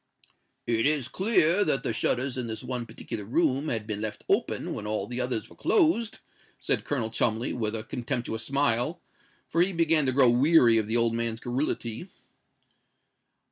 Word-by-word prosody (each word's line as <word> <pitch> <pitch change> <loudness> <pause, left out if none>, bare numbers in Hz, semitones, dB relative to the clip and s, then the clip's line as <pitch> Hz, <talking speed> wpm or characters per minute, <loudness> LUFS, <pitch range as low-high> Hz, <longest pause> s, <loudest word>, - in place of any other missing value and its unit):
"It 115 +2 +1
is 145 -4 0
clear 190 -2 +2
that 145 -6 0
the 115 - -1
shutters 125 +4 0
in 125 -2 -3
this 110 +1 -5
one 125 -2 -4
particular 110 -1 -7
room 140 +5 0
had 110 -5 -2
been 105 -1 -4
left 110 -1 -5
open - - 0
when 105 - -6
all 105 -2 -2
the 125 +3 -4
others 125 -3 -2
were - - -17
closed," 310 - +1 0.4
said - - -1
Colonel 120 -6 -1
Cholmondeley, 115 +1 0
with 110 -2 -2
a 110 - -4
contemptuous 120 -1 -3
smile; 140 +4 +1 0.5
for 165 - +1
he 185 +2 +2
began 165 -4 +3
to - - +4
grow 130 -2 +5
weary 125 -3 +5
of 105 - -2
the 115 +2 +1
old 115 -1 +2
man's 115 -1 -1
garrulity. 120 - -3
125 Hz, 175 wpm, -27 LUFS, 115-150 Hz, 0.5 s, grow